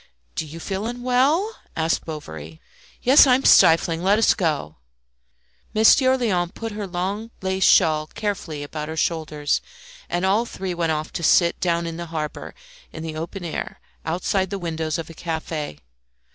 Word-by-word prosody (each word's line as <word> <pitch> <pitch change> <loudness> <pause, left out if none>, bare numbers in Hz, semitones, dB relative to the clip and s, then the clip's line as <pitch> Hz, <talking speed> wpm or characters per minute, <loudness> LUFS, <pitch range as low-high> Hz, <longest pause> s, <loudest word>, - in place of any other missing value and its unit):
"Do 160 - -4
you 160 +3 -9
feel 195 +5 -3
unwell?" 255 - +1 0.2
asked 160 +1 0
Bovary. 80 - -8 0.4
"Yes, 270 +3 +7
I 250 - +6
am 265 - -2
stifling; 165 0 +5
let 195 +3 +3
us 225 - +4
go." 150 - -2 1.0
Monsieur 260 +4 +5
Léon 180 -8 0
put 225 0 -5
her 205 -1 -5
long 190 +5 -3
lace 190 0 0
shawl 155 -1 +4
carefully 165 -7 -4
about 150 +1 -6
her 160 +1 -6
shoulders, 155 -3 -1 0.5
and 175 +2 -1
all 210 +5 +2
three 190 -4 -4
went 170 -2 0
off 155 0 -3
to - - -4
sit 170 +1 +3
down 170 -1 0
in 165 -1 -5
the 170 0 -6
harbour, 155 -2 -5 0.4
in 160 - -8
the 160 -1 -5
open 175 +4 -6
air, 165 - -5 0.2
outside 185 +3 -1
the 200 - -3
windows 160 -3 -3
of 165 - -5
a 165 - -10
cafe. 160 - -4
170 Hz, 165 wpm, -23 LUFS, 160-205 Hz, 1.0 s, Yes